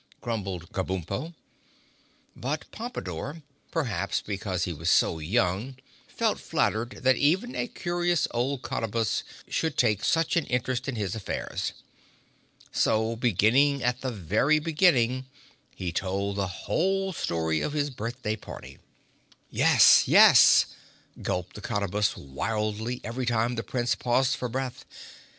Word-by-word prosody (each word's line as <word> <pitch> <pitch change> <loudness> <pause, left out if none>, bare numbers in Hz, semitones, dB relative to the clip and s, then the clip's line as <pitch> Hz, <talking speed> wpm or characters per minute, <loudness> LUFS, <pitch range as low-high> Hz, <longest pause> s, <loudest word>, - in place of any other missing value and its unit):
grumbled 95 -7 -4
Kabumpo. 95 - -3 1.0
But 145 +4 -3
Pompadore, 155 - -6 0.3
perhaps 110 - -1
because 95 -3 -3
he 90 - -2
was 80 +2 -2
so 80 - +3
young, 100 - 0 0.3
felt - - -1
flattered 115 +4 -1
that 130 0 +4
even 190 - +1
a - - -1
curious 175 -4 0
old 125 +3 -1
Cottabus 115 0 -1 0.3
should 160 -3 -1
take 105 -4 +2
such 165 -1 +2
an 170 - +1
interest 125 +1 -1
in 130 - -3
his 100 -4 -2
affairs. 110 -4 -4 1.0
So 110 +1 +1
beginning 125 +5 +3
at 125 +1 0
the 130 - -2
very 110 - +2
beginning 150 -6 +2 0.5
he 90 -2 -4
told 100 +2 -2
the 100 -1 -1
whole 190 - -1
story 80 - -1
of 150 - -2
his 145 -1 -1
birthday 115 -2 -4
party. - - -11 0.7
"Yes, - - +6
yes," - - +8 0.6
gulped 90 0 -3
the 105 - -9
Cottabus 105 -1 -1
wildly 110 - -3
each 120 +2 -3
time 120 0 +1
the 115 - -2
Prince 120 +3 -1
paused 130 +2 +1
for 125 - -4
breath. 130 +1 -4
115 Hz, 130 wpm, -27 LUFS, 100-135 Hz, 1.0 s, yes